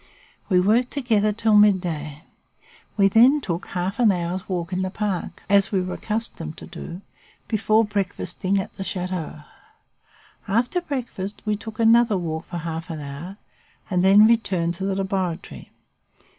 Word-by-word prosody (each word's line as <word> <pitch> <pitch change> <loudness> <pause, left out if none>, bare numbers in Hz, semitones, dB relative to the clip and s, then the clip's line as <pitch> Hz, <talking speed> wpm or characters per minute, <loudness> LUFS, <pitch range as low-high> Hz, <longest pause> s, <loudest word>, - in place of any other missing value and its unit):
We 185 -3 +4
worked 225 +7 +3
together 220 -7 +1
till 220 0 +2
midday. 170 -7 +2 0.7
We 200 -1 +5
then 245 +9 +5
took 175 -9 -4
half 185 +4 -3
an 230 -4 +5
hour's 180 +1 -3
walk 175 -1 -3
in 185 - 0
the 185 - -1
park, 200 -2 -4
as 200 0 +3
we 195 - +2
were 180 0 -3
accustomed 210 -8 -4
to - - -9
do, 175 +3 -8 0.5
before 220 0 +2
breakfasting 200 -1 -2
at 190 - -6
the 195 - -4
chateau. 180 -5 -4 1.1
After 240 - +1
breakfast, 235 - -5
we 210 -1 +1
took 215 +1 -9
another 230 -2 +5
walk 160 -2 -4
for 175 - -6
half 165 +1 -5
an 160 -2 -5
hour, 150 +7 -8 0.5
and 180 -1 +2
then 200 +3 +7
returned 195 -7 +2
to 190 +2 -4
the 195 -1 -1
laboratory. 190 -3 -3
195 Hz, 155 wpm, -23 LUFS, 175-215 Hz, 1.1 s, then